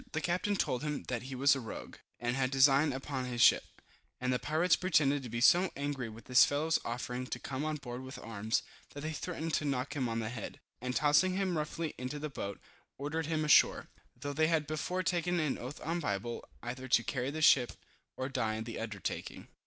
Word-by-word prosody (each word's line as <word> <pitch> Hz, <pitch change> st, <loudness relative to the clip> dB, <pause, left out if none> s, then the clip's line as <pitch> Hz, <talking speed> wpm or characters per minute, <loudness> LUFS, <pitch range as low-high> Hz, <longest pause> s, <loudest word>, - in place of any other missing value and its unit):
The 155 Hz, -, 0 dB
captain 180 Hz, +5 st, 0 dB
told 125 Hz, -9 st, 0 dB
him 150 Hz, -1 st, -3 dB
that 125 Hz, -3 st, -1 dB
he 130 Hz, +1 st, -7 dB
was 140 Hz, +3 st, +5 dB
a -, -, -3 dB
rogue, 115 Hz, -3 st, -8 dB, 0.2 s
and 120 Hz, +1 st, -1 dB
had 130 Hz, -1 st, +1 dB
a -, -, -13 dB
design 135 Hz, +2 st, +5 dB
upon 135 Hz, 0 st, -3 dB
his 125 Hz, -1 st, -4 dB
ship, -, -, +6 dB, 0.6 s
and 125 Hz, 0 st, 0 dB
the 125 Hz, -, 0 dB
pirates 160 Hz, +4 st, +3 dB
pretended 145 Hz, -6 st, +2 dB
to 125 Hz, -, -7 dB
be 120 Hz, +1 st, -3 dB
so 175 Hz, +7 st, +6 dB
angry 140 Hz, -4 st, -3 dB
with 110 Hz, +2 st, -12 dB
this 125 Hz, -1 st, +7 dB
fellow's 155 Hz, +3 st, +2 dB
offering 125 Hz, +1 st, -4 dB
to -, -, -3 dB
come 130 Hz, +3 st, -4 dB
on 155 Hz, 0 st, -1 dB
board 125 Hz, -4 st, -6 dB
with 130 Hz, +1 st, -8 dB
arms, 110 Hz, 0 st, -2 dB, 0.3 s
that 145 Hz, -, -6 dB
they 155 Hz, +2 st, -3 dB
threatened 165 Hz, -1 st, -4 dB
to -, -, +1 dB
knock 135 Hz, -1 st, -1 dB
him 130 Hz, -4 st, 0 dB
on 115 Hz, -, -2 dB
the 110 Hz, -1 st, -2 dB
head, 115 Hz, -3 st, -6 dB, 0.2 s
and 125 Hz, 0 st, -3 dB
tossing 155 Hz, +5 st, +4 dB
him 190 Hz, -3 st, 0 dB
roughly 155 Hz, +1 st, -2 dB
into 130 Hz, +3 st, -4 dB
the 150 Hz, +1 st, -4 dB
boat, 100 Hz, -6 st, -5 dB, 0.4 s
ordered 145 Hz, +3 st, -2 dB
him 155 Hz, -1 st, 0 dB
ashore, 150 Hz, -, +5 dB, 0.3 s
though 145 Hz, +3 st, -5 dB
they 155 Hz, +2 st, +3 dB
had 160 Hz, -2 st, +2 dB
before 165 Hz, +5 st, -2 dB
taken 175 Hz, 0 st, +1 dB
an 150 Hz, -4 st, 0 dB
oath 130 Hz, +4 st, -7 dB
on 165 Hz, +2 st, 0 dB
the -, -, -3 dB
Bible, 115 Hz, -2 st, -3 dB, 0.2 s
either 130 Hz, +2 st, -5 dB
to 120 Hz, -2 st, +4 dB
carry 130 Hz, +1 st, -2 dB
the 155 Hz, +2 st, -3 dB
ship, 125 Hz, -5 st, +6 dB, 0.4 s
or 130 Hz, -, -2 dB
die 120 Hz, -5 st, -1 dB
in 110 Hz, -, -3 dB
the 115 Hz, 0 st, -6 dB
undertaking. 110 Hz, -4 st, -5 dB
135 Hz, 225 wpm, -32 LUFS, 125-155 Hz, 0.6 s, this